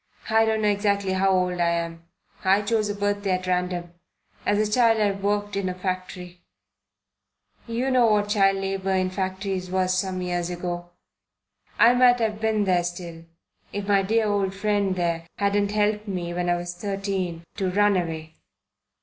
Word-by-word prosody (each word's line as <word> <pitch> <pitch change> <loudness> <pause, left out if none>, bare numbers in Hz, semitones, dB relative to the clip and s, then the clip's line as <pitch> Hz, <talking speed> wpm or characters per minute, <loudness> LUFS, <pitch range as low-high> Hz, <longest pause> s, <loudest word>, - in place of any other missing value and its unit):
I 225 0 +5
don't 220 -1 0
know - - +3
exactly 200 -1 +1
how 190 +1 +2
old 180 -1 +1
I 170 -1 +3
am. 170 0 -3 0.4
I 195 +2 +3
chose 215 0 0
a 205 - -2
birthday 205 -1 0
at 185 - -9
random. 180 -1 -2 0.5
As 205 - +3
a - - -8
child 230 -2 +4
I 205 -1 +3
worked 205 +1 -2
in 195 -2 -1
a 180 - -4
factory. 180 -1 -5 1.3
You 240 +3 -1
know 250 -2 +4
what 205 -1 +2
child 195 -2 +3
labour 195 0 -2
in 185 -1 +1
factories 190 -1 -3
was 185 0 +1
some 185 -1 -2
years 175 -1 -2
ago. 175 0 -4 0.9
I 235 +1 +6
might 245 0 +5
have 215 -2 -1
been 220 -1 +1
there 180 -3 +2
still, 175 -1 -6 0.5
if 205 -1 -4
my 200 -1 +4
dear 220 +3 +1
old 200 -2 0
friend 200 -1 0
there 170 -2 -1
hadn't 200 0 +1
helped 210 0 0
me 175 -3 -3
when 175 0 -1
I 175 - +3
was 175 0 -4
thirteen 190 -3 -3
to 190 -3 0
run 205 +2 +3
away. 160 -3 -3
195 Hz, 175 wpm, -24 LUFS, 180-205 Hz, 1.3 s, I